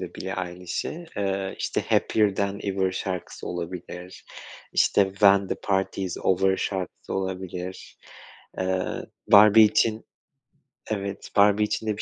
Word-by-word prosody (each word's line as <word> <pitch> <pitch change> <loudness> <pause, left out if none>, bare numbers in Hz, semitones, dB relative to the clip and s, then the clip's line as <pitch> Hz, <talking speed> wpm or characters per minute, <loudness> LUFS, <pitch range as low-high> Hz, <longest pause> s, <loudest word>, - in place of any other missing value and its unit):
de - - -7
Billie 95 +1 -5
Eilish'i. 90 - -5
Iıı 95 -1 -2
işte - - -1
Happier 105 -3 +2
Than 100 +1 -2
Ever 95 -1 0
şarkısı 95 -1 -5
olabilir, 90 +1 -7 0.5
işte 100 - +4
When 100 -1 +4
The - - -1
Party's 95 -2 -2
Over 95 +1 +2
şarkısı 95 -3 -4
olabilir, 95 -1 -5 0.6
eee, 95 0 0 0.5
Barbie 105 +1 +9
için 110 +1 +2 0.9
evet, 100 -1 -4
Barbie 105 +1 +5
için 110 +1 -3
de 105 -1 -1
bir - - -4
95 Hz, 125 wpm, -25 LUFS, 95-100 Hz, 0.9 s, Barbie